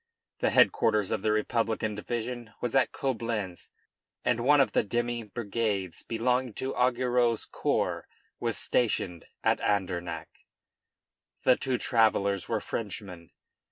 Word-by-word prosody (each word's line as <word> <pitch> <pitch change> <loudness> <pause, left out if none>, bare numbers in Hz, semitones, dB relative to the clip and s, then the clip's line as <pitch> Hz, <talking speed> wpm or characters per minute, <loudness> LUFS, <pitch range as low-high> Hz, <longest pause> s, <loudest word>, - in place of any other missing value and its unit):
The - - +2
headquarters 105 -3 +3
of - - 0
the 110 - +1
Republican 110 0 0
division 120 +1 -4
was 125 - -2
at 135 - +4
Coblentz, 115 -8 -3 0.6
and 120 - +2
one 145 +5 +5
of 135 - +4
the - - +3
demi 120 +2 -1
brigades 105 -4 -2
belonging 125 +1 0
to 130 +1 -3
Augereau's 125 -2 +2
corps - - -1 0.3
was - - 0
stationed 90 -8 0 0.2
at - - +3
Andernach. 90 -5 -2 1.0
The 125 - +6
two 130 -1 -1
travellers 100 -6 +2
were - - +1
Frenchmen. 95 -6 -6
115 Hz, 120 wpm, -29 LUFS, 100-120 Hz, 1.0 s, The